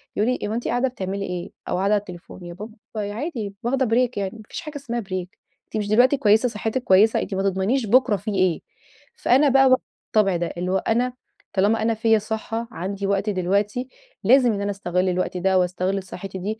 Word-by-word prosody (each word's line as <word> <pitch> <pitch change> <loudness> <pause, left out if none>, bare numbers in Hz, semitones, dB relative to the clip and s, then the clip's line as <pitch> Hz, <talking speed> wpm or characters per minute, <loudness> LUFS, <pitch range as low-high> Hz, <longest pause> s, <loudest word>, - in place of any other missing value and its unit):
يقول 215 +4 +1
لي: 250 - -2
"هو 210 - -3
أنتِ 235 +2 -2
قاعدة 245 +2 +1
بتعملي 195 -4 -4
إيه؟" 180 -2 -5 0.2
أو - - 0
قاعدة 195 +3 +2
على 210 - +4
التليفون. 180 -1 -11
يا 175 - -7
بابا 210 +5 -9 0.2
عادي 215 - -4
واخدة 260 +3 +1
break 245 +2 +2
يعني 195 -2 -1
ما - - -11
فيش - - -5
حاجة 305 -2 -9
اسمها 240 -4 -4
break. 185 -3 -4 0.4
أنتِ - - -5
مش 210 -1 -2
دلوقتي 245 +6 +4
كويسة 220 0 +4
صحِّتِك 220 +3 -3
كويسة، 210 +1 +4
أنتِ - - -5
ما 195 - -1
تضمنيش 195 +7 +1
بكرة 245 -1 +4
في 210 +3 -5
إيه. 185 -4 +1 0.5
فأنا 275 +4 +4
بقى 270 0 +5
و 255 - +7 0.3
الطبع 200 -4 +2
ده. 170 - -1
اللي 180 +1 -2
هو 190 - +3
أنا 245 +5 0 0.4
طالما 210 +3 +2
أنا 225 +1 +2
فيّا 225 0 +3
صحّة، 220 +2 -4
عندي 195 +1 -4
وقت 200 +1 0
دلوقتي، 205 +6 0 0.4
لازم 245 +2 +5
إن 200 - -3
أنا 200 0 -1
أستغل 185 -2 -1
الوقت 180 0 -1
ده، 190 +1 +2
وأستغل 185 +2 -1
صحّتي 190 +1 -7
دي 215 +4 -4
210 Hz, 210 wpm, -23 LUFS, 190-235 Hz, 0.5 s, و